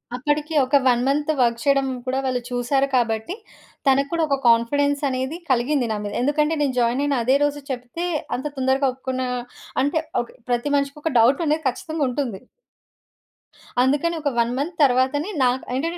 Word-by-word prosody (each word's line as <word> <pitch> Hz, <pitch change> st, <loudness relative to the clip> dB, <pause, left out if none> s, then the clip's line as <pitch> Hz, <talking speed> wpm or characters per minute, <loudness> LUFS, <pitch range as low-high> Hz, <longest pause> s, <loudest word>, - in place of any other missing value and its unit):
అప్పటికి, 295 Hz, +4 st, -1 dB
ఒక 265 Hz, +3 st, +1 dB
1 245 Hz, -1 st, +3 dB
month 295 Hz, +2 st, +1 dB
work 235 Hz, -2 st, +2 dB
చేయడం 275 Hz, -1 st, +2 dB, 0.2 s
కూడా 260 Hz, +1 st, -1 dB
వాళ్ళు 255 Hz, -1 st, -1 dB
చూసారు 250 Hz, +3 st, +1 dB
కాబట్టి, 225 Hz, +4 st, 0 dB, 0.5 s
తనకి 275 Hz, +1 st, +3 dB
కూడా 335 Hz, -1 st, +1 dB
ఒక 280 Hz, -, +2 dB
కాన్ఫిడెన్సనేది 275 Hz, +4 st, +1 dB
కలిగింది 260 Hz, +1 st, +1 dB
నా 215 Hz, -, -1 dB
మీద. 205 Hz, 0 st, -5 dB
ఎందుకంటే 300 Hz, +4 st, +1 dB
నేను 280 Hz, -3 st, +1 dB
జాయినయిన 265 Hz, +4 st, +1 dB
అదే 260 Hz, +3 st, +3 dB
రోజు 290 Hz, 0 st, -1 dB
చెప్తే, 250 Hz, +7 st, -5 dB, 0.3 s
అంత 260 Hz, -, -5 dB
తొందరగా 265 Hz, +1 st, +2 dB
ఒప్పుకున్న 260 Hz, 0 st, -4 dB, 0.6 s
అంటే 290 Hz, +3 st, +1 dB, 0.2 s
ఒక్ 240 Hz, -, -9 dB, 0.2 s
ప్రతి 245 Hz, +4 st, 0 dB
మనిషికి 280 Hz, +1 st, -2 dB
ఒక 320 Hz, -, 0 dB
డౌటనేది 295 Hz, +6 st, +3 dB
ఖచ్చితంగా 315 Hz, +4 st, -2 dB
ఉంటుంది. 245 Hz, -6 st, -3 dB, 1.4 s
అందుకని 290 Hz, +6 st, +1 dB
ఒక 290 Hz, -, 0 dB
1 235 Hz, 0 st, +2 dB
మంత్ 310 Hz, +6 st, -3 dB
తరువాతనే 265 Hz, +5 st, +2 dB
నాక్ 255 Hz, +1 st, +1 dB
ఏంటంటే 330 Hz, +7 st, -2 dB
270 Hz, 155 wpm, -22 LUFS, 250-290 Hz, 1.4 s, 1